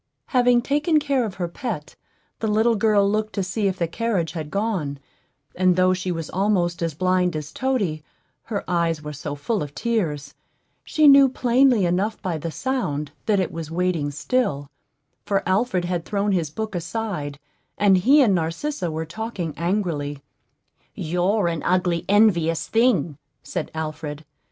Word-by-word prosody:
Having 245 -2 +4
taken 300 +4 +2
care 280 -4 +1
of 200 -3 -6
her 175 -2 -2
pet, 175 - -5 0.4
the 220 - -1
little 220 +2 +3
girl 210 -2 +3
looked 215 +1 -1
to 200 - -1
see 200 +2 -1
if 190 -1 -1
the 170 - 0
carriage 195 -3 -1
had 160 -3 -5
gone; 190 -8 -2 0.6
and 185 -1 +3
though 185 0 +4
she 185 0 -2
was 165 -2 -4
almost 180 -3 +1
as 165 -3 -1
blind 185 0 +1
as 150 -1 -5
Toady, 205 -13 -1 0.4
her 210 -4 -3
eyes 165 -3 0
were 150 0 -6
so 145 0 -5
full 200 +9 -2
of 145 -1 -6
tears, 175 - -2 0.5
she 310 -1 +3
knew 275 -1 +8
plainly 250 -4 +3
enough 190 +5 0
by 175 -6 -3
the 165 - -4
sound 155 - -2 0.2
that 210 -3 +3
it 185 - -1
was 165 -2 -6
waiting 170 -3 0
still; 145 - -1 0.5
for 195 -1 0
Alfred 185 -1 +1
had 175 -1 -2
thrown 205 +2 -1
his 170 -5 0
book 215 +7 -5
aside, 175 -5 -4 0.4
and 200 -2 +5
he 275 +9 +6
and 210 -6 +3
Narcissa 175 - -2
were 160 +1 -3
talking 180 -2 -5
angrily. 165 -6 -2 0.7
"You're 180 +4 0
an 165 -3 -2
ugly, 180 -2 +1
envious 175 -6 +3
thing," 190 - +2 0.2
said 175 -4 -4
Alfred. 155 -1 -5
185 Hz, 160 wpm, -23 LUFS, 160-220 Hz, 0.7 s, knew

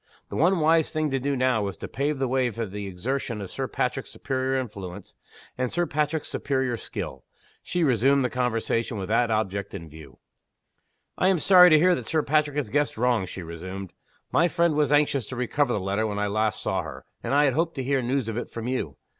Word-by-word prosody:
The - - -6
one 175 +4 +3
wise 160 0 +3
thing 155 -2 -1
to 135 - 0
do 140 +2 -1
now 130 -3 +2
was 100 -4 -3
to - - -6
pave 145 +2 -1
the 135 0 0
way 130 0 +1
for 115 0 -4
the 100 0 -6
exertion 115 +5 -3
of 100 -2 -7
Sir - - -3
Patrick's - - -2
superior 130 -1 -1
influence, 100 -6 -7 0.5
and 125 -1 0
Sir 175 0 +1
Patrick's 150 0 -1
superior 130 -3 -1
skill. - - -6 0.4
She 175 -1 -1
resumed 135 0 +3
the - - 0
conversation 115 -2 -1
with 95 -1 -5
that 115 +2 +2
object 100 -3 -1
in 85 -4 -7
view. 75 -4 -13 1.0
"I 185 - +4
am 190 -1 +4
sorry 180 +2 +7
to 155 - +7
hear 180 +4 +5
that - - -3
Sir 155 -2 +1
Patrick 150 0 +1
has 130 -8 -2
guessed 145 -1 0
wrong," 120 -5 +1
she 90 0 -7
resumed. 90 +3 -7 0.4
"My 170 - +4
friend 170 -1 +2
was 150 -2 +1
anxious 145 -5 +2
to 130 - -6
recover 125 +2 0
the 105 - 0
letter 100 +3 -1
when 105 -1 -3
I 105 - 0
last 110 +1 0
saw 95 -1 0
her; 80 - -9 0.2
and 140 - -1
I 145 -1 +5
hoped 165 +4 0
to 135 - -3
hear 135 +1 +1
news 125 0 -1
of 115 0 -3
it 120 - -4
from 115 0 -6
you. 130 0 -3
125 Hz, 220 wpm, -26 LUFS, 105-145 Hz, 1.0 s, sorry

